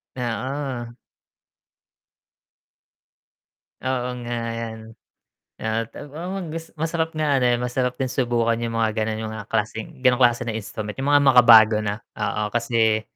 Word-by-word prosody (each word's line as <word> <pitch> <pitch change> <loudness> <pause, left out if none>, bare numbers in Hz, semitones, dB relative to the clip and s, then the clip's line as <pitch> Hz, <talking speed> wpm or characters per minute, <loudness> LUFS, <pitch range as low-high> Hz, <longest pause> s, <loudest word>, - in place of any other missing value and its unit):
Oo. 125 0 -4 2.9
Oo 125 -1 -1 0.2
nga, 120 - -3 0.2
ayan. 115 -1 -5 0.8
Ah, 110 +1 -2
ta - - -10
ma 180 +5 -5
gus 165 0 -6
masarap 160 0 -1
nga 145 -3 +2
ano, 125 - +1
eh, 120 - +3
masarap 125 +1 -1
din 130 -2 -2
subukan 120 -2 +1
'yung 115 -1 -3
mga 110 -1 +2
gano'n, 110 0 -1
'yung 110 - -4
mga 110 -2 -7
klaseng, 110 +4 -3
gano'ng 125 0 +4
klase 120 -1 +4
na 115 - -2
instrument 105 0 -5
'yung 140 +2 0
mga 145 - +5
makabago 115 -5 +7
na, 105 +1 -4
oo 105 0 -2
kasi, 115 -2 +2
120 Hz, 140 wpm, -23 LUFS, 110-130 Hz, 2.9 s, makabago